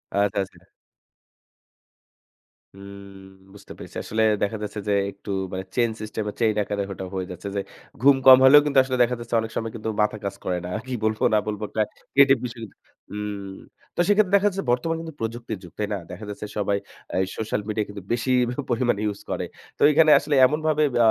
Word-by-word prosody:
আচ্ছা, 100 0 +1
আচ্ছা। 95 - -15 2.1
উম 100 0 -12 0.3
বুঝতে 100 - -14
পেরেছি। - - -10
আসলে 110 +1 -2 0.2
দেখা 105 +2 -1
যাচ্ছে 105 0 -5
যে, 105 - +2 0.2
একটু 100 +1 -9 0.2
মানে 95 0 -4
চেইন 120 -2 +2
সিস্টেমে, 105 0 -4
চেইন 110 -3 +2
আকারে 100 0 -2
ওটা 95 0 -6
হয়ে 95 -1 -3
যাচ্ছে 90 +3 -8
যে, 100 - 0 0.4
ঘুম 140 +2 +7
কম 130 -1 +11
হলেও 140 +3 +9
কিন্তু 145 -2 0
আসলে 130 -1 -2
দেখা 125 +1 0
যাচ্ছে, 120 0 -4
অনেক 110 0 -6
সময় 115 0 -2
কিন্তু 110 0 -4
মাথা 105 0 +1
কাজ 100 0 -3
করে 90 - 0
না। - - -5 0.2
কি 130 - -4
বলবো 110 0 0
না - - +5
বলবো? 105 0 -3
একটা 110 - -1 0.3
ক্রিয়েটিভ 135 -1 +6
বিষয় 120 -1 -7
কিন্তু 110 - -11 0.4
হুম। 100 -2 -5 0.4
তো - - -7
সেক্ষেত্রে 205 -1 +3
দেখা 200 +1 +4
যাচ্ছে 195 0 -4
বর্তমান 165 +7 0
কিন্তু 165 -1 -8
প্রযুক্তির 115 -1 -4
যুগ। 90 - -12
তাই 105 - 0
না? - - -1
দেখা 95 +4 -8
যাচ্ছে 105 +1 -6
সবাই 100 -1 +1 0.4
আ - - -2 0.2
সোশ্যাল 110 -1 -2
মিডিয়া 110 -1 -1
কিন্তু 100 0 -8
বেশি 120 +2 -1 0.2
প - - -2 0.2
পরিমাণে 120 -3 +1
ইউস 105 -1 -3
করে। - - -2 0.3
তো - - -16
এখানে 155 +1 +5
আসলে 145 0 -1
এমনভাবে 155 +2 +1
ব্য - - 0
110 Hz, 195 wpm, -24 LUFS, 100-130 Hz, 2.1 s, কম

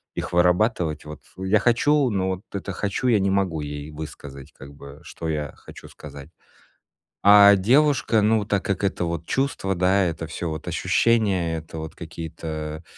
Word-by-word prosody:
их - - -4
вырабатывать. 90 -3 +1
Вот, 75 0 -9 0.2
я 95 +3 +1
хочу, 135 +4 +2
но, 95 -3 -1
вот, 95 0 -3
это 100 0 -4
хочу, 100 +6 -2
я 115 -4 +4
не 95 0 +1
могу 95 -5 0
ей 75 +1 -6
высказать, 70 -3 -9
как 70 +2 -13
бы, 70 +1 -13
что 80 -1 -6
я 75 -2 -3
хочу - - -13
сказать. 70 0 -12 0.9
А 100 0 +8
девушка, 125 +1 +3
ну, 110 0 +2
так 100 -1 -1
как 100 -1 -2
это, 95 -2 -1
вот, 85 -1 -4
чувство, 130 -8 -1
да, 95 +2 +2
это 80 -1 -3
всё 80 +2 -5
вот 80 -1 -6
ощущения, 100 -8 +1
это, 80 0 -9
вот, 80 0 -7
какие-то 80 -1 -7
90 Hz, 165 wpm, -23 LUFS, 80-100 Hz, 0.9 s, А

